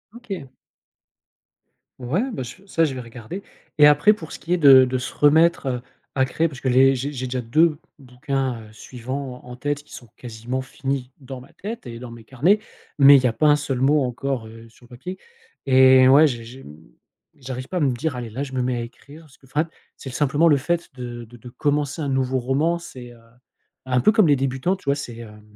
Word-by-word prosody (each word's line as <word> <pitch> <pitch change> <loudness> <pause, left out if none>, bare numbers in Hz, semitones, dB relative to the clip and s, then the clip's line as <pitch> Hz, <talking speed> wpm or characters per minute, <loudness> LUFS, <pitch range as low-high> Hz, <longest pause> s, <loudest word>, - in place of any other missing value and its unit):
OK. 200 - -7 1.5
Ouais 130 - -1
ben 170 - -4
ch 125 +10 -11
ça 165 -4 +2
je 140 - -3
vais 130 - -6
regarder 120 - -9 0.4
et 150 - +9
après 150 +8 +5
pour 165 -7 -10
ce - - -7
qui 170 - -3
est - - +2
de 135 -4 +8
de 130 0 -2
se 125 - -5
remettre, 160 +3 +4
heu, 125 -2 -2 0.3
à 130 -1 +2
créer 160 +6 0
parce 135 -5 -10
que - - -3
les 135 +2 +5
j'ai 135 +3 -3
j'ai 130 -2 -5
déjà 125 0 -3
2 155 +6 +2 0.2
bouquins, 130 -2 -4
heu, 110 - -14
suivants 125 +3 -7
en 125 0 -10
tête 145 +3 -3
qui - - -18
sont 120 - -12
quasiment 120 +2 -5
finis 135 -1 -4
dans 130 -2 -9
ma 130 - -17
tête 215 - -7
et 115 - -7
dans 120 0 -9
mes 115 -1 -12
carnets, 150 - +2 0.4
mais 140 +1 +9
il 130 - 0
y - - +1
a 115 - -1
pas 155 - +2
un 150 - +6
seul 145 -4 -3
mot 145 +2 +3
encore, 125 -1 -3
heu, 115 +1 -13
sur 120 +2 -21
le - - -22
papier 180 +10 -8 0.5
et 130 -1 +6
ouais 145 +4 +7
j 120 -5 -4
j 130 +3 -12
mmh 75 +1 -13 0.6
j'arrive 130 -1 -7
pas 185 - -4
à - - +1
me 140 -3 +2
dire: 145 +3 -3
«Allez 120 -2 -6
là 125 +6 -5
je 135 -2 -8
me 130 - -1
mets 125 0 -1
à - - -3
écrire», 140 +6 -12
parce 150 -4 -20
que - - -22
fat 150 +5 -1 0.3
c'est 135 - -9
l - - -9
simplement 145 +4 +2
le 150 -3 +5
fait 170 +5 -2
de 120 -2 -7
de 120 +2 -16
de 125 +2 -12
commencer 145 +3 -1
un 140 - -2
nouveau 130 -1 0
roman 140 +7 0
c'est, 125 -7 -11
heu, 120 - -18 0.7
un 125 -1 +1
peu 215 - +5
comme 215 -5 +4
les 145 - +5
débutants 135 +7 -1
tu 190 - -19
vois? 140 - +2
C'est, 125 -5 -7
hem, 105 -2 -11
130 Hz, 235 wpm, -22 LUFS, 125-150 Hz, 1.5 s, et